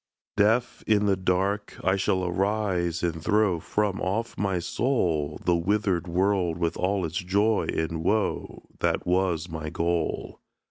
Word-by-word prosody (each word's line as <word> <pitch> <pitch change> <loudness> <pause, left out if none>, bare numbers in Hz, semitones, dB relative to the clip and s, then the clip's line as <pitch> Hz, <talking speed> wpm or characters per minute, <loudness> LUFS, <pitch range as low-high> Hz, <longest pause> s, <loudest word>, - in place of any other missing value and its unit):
Deaf, 115 +4 +2
in 105 -1 +3
the 100 -1 +3
dark, 95 +3 -1
I 95 +1 +3
shall 95 -1 0
arise 90 -2 0
and 80 -2 -2
throw 105 -4 +2
From 100 +3 -1
off 110 +5 -2
my 95 -2 0
soul, 85 - 0
The 90 - +4
withered 90 0 0
world 90 -1 +1
with 85 -1 -1
all 95 0 0
its 80 +1 -4
joy 100 +4 +1
and 80 0 -2
woe, 105 +4 -1 0.2
That - - 0
was 90 -2 +1
my 80 -2 -5
goal. 85 +1 -2
95 Hz, 145 wpm, -26 LUFS, 85-105 Hz, 0.2 s, The